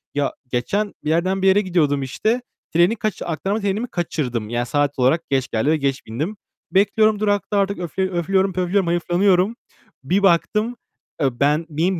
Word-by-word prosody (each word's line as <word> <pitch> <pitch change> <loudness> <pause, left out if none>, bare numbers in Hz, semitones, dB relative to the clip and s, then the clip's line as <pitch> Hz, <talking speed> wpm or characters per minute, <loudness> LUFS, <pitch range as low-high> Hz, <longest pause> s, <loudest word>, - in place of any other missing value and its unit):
Ya 145 -1 0 0.2
geçen 200 +12 -1
bir 150 - -2
yerden 185 +4 +1
bir 190 - +3
yere 195 +2 +5
gidiyordum 155 -7 +1
işte, 215 - -1 0.3
treni 175 +7 +4
kaç 215 0 -3
aktarma 190 +7 -2
trenimi 205 +4 -1
kaçırdım. 125 - -3
Yani 120 +1 -1
saat 145 +1 0
olarak 135 +7 +2
geç 135 -2 +1
geldi 110 +6 +1
ve 155 - +3
geç 140 -1 -2
bindim. 155 - -4 0.3
Bekliyorum, 210 +2 +3
durakta 205 -1 0
artık, 200 -1 0
öfle 185 +2 -2
öflüyorum, 190 +2 +1
pöflüyorum, 185 +1 0
hayıflanıyorum. 180 +4 +2 0.5
Bir 190 +8 +1
baktım, 210 +6 +2 0.5
eee, 135 - +3
ben 150 +3 +2
benim 165 +4 0
175 Hz, 165 wpm, -21 LUFS, 145-200 Hz, 0.5 s, yere